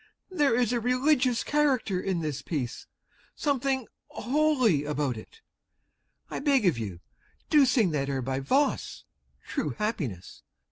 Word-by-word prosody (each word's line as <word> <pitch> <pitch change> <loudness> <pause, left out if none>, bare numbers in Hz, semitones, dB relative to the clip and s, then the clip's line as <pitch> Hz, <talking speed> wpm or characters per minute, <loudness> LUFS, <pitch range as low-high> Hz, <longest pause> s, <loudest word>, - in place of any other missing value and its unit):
There 295 -9 +2
is 245 -1 +1
a 240 - +1
religious 250 0 +2
character 265 -11 +1
in 185 -3 -1
this 150 -3 -3
piece, 130 -7 -4 0.5
something 270 -3 0 0.2
holy 255 - +2
about 145 -3 -1
it! 110 - -12 0.9
I - - -5
beg 275 -6 +2
of 165 -10 +2
you, 95 -6 -6 0.5
do 295 -4 +6
sing 230 - +3
that 140 -2 -1
air 135 -2 -2
by 130 +1 -2
Voss, 270 - 0 0.4
"True - - -2
Happiness." 150 - -4
230 Hz, 135 wpm, -28 LUFS, -, 0.9 s, do